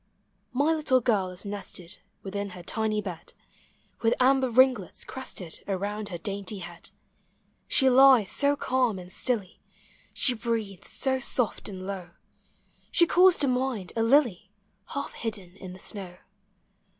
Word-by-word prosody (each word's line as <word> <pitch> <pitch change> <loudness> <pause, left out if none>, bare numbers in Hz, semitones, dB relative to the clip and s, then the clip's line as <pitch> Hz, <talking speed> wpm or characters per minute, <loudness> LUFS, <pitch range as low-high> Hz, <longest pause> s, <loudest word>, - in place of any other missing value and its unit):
My 285 +5 +2
little 295 -5 +2
girl 215 -6 +1
is 180 +2 -5
nested 200 -4 -5 0.2
Within 200 +1 -4
her 175 - -10
tiny 215 +2 -1
bed, 175 -4 -8 0.7
With 225 0 +3
amber 260 0 +4
ringlets 250 -6 +2
crested 190 -10 -5
Around 205 +2 -3
her 175 - -5
dainty 200 +3 -4
head; 175 -2 -8 0.8
She 265 - +4
lies 260 -5 +6
so 285 0 +3
calm 255 -6 0
and 180 0 -10
stilly, 215 -7 -2 0.5
She 255 - +1
breathes 220 -5 -4
so 265 -1 +1
soft 245 -4 0
and 185 -2 -7
low, 190 -3 -5 0.8
She 345 - +5
calls 360 +1 +6
to 285 - +3
mind 250 -7 -1
a 225 - 0
lily 225 -6 +2 0.4
Half 280 0 -5
hidden 200 -6 -5
in 185 -2 -9
the - - -11
snow. 185 -2 -5
215 Hz, 140 wpm, -27 LUFS, 190-260 Hz, 0.8 s, lies